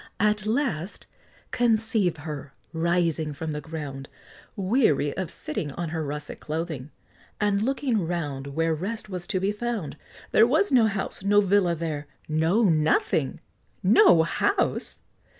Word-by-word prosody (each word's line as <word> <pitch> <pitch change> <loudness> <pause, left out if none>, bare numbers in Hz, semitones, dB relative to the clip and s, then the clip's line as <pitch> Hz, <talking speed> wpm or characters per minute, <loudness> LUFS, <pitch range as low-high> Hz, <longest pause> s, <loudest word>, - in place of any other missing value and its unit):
At 210 0 +1
last, 215 - -1 0.5
conceive 225 -7 +2
her, 145 -2 -7 0.2
rising 165 -2 +1
from 160 +2 -4
the 150 0 -4
ground, 140 -3 -7 0.5
Weary 190 - +2
of 185 -4 -3
sitting 150 -1 -4
on 170 +1 -4
her 160 0 -2
russet 150 0 -5
clothing, 155 -3 -4 0.5
And 205 -1 +2
looking 245 - 0
round 145 -6 -3
Where 165 +3 0
rest 210 +7 -4
was 180 -2 -5
to 185 - 0
be 195 +2 +1
found, 210 -8 -4 0.3
There 225 - +6
was 315 +11 +2
no 240 -4 +5
house 195 -2 -3
no 205 +1 +5
villa 195 -3 +3
there 155 -3 -4 0.2
no 160 +8 +2
nothing! 165 - +2 0.4
No 370 - +6
house! 400 - 0
175 Hz, 135 wpm, -26 LUFS, 155-215 Hz, 0.5 s, There